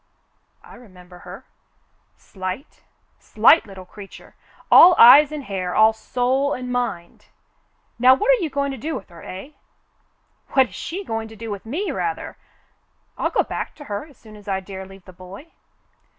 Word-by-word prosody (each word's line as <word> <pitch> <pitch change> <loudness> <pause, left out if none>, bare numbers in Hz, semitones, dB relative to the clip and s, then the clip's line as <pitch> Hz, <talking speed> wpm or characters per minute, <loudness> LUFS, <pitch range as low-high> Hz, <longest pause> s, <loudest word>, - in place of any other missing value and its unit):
"I - - -16
remember 180 -6 -16
her, - - -12 0.4
— - - -44
slight 190 +8 -7 0.2
— - - -43
slight 330 - +3
little 190 -2 -11
creature, 195 +1 -14 0.4
all 360 0 +8
eyes 280 +5 +8
and 300 -2 -6
hair, 185 -5 -4
all 220 +1 +5
soul 255 +5 -1
and 250 0 -7
mind. 240 -9 -4 0.7
Now 255 +2 +6
what 420 - +1
are - - +2
you 320 - -2
going 280 0 -2
to 265 - -8
do 315 +7 -4
with 195 - -9
her, 170 -1 -14
eh.^^" 195 +11 -10 0.5
" - - -32
AVhat 265 -3 +4
is - - -18
she 380 +4 -6
going 225 - -5
to 220 - -13
do 225 0 -8
with 200 +1 -8
me, 345 - -3
rather! 415 - -4 0.8
I'll - - -2
go - - +1
back - - -6
to 295 - -12
her 215 +3 -6
as 285 - -21
soon 215 -1 -16
as 210 0 -16
I 190 -1 -1
dare 190 0 -9
leave 195 -1 -16
the 185 - -14
boy." 190 - -13
225 Hz, 185 wpm, -21 LUFS, 190-280 Hz, 0.8 s, all